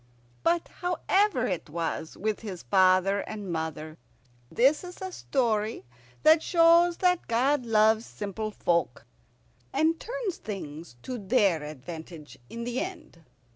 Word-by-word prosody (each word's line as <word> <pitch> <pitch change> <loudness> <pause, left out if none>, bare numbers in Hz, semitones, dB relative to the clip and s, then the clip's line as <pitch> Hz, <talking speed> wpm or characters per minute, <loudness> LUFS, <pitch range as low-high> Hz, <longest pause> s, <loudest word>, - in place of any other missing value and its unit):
But 340 0 +1
however 360 - +1
it 180 -8 -3
was 165 0 -4
with 215 +1 -2
his 190 -6 -7
father 190 +1 +4
and 205 -3 -6
mother, 160 -1 -4 0.5
this 275 +7 +3
is 360 0 -9
a 375 0 -5
story 225 - -1 0.4
that 315 +1 +6
shows 340 +1 +4
that 360 -1 +1
God 250 +2 +1
loves 220 0 +4
simple 215 +1 -5
folk, 170 - -1 0.7
and 320 +1 +1
turns 475 -6 -4
things 160 - -7
to 255 -2 -5
their 200 -5 +2
advantage 155 +2 -9
in 235 - -6
the 245 +1 -2
end. 345 - -7
220 Hz, 130 wpm, -27 LUFS, -, 0.7 s, that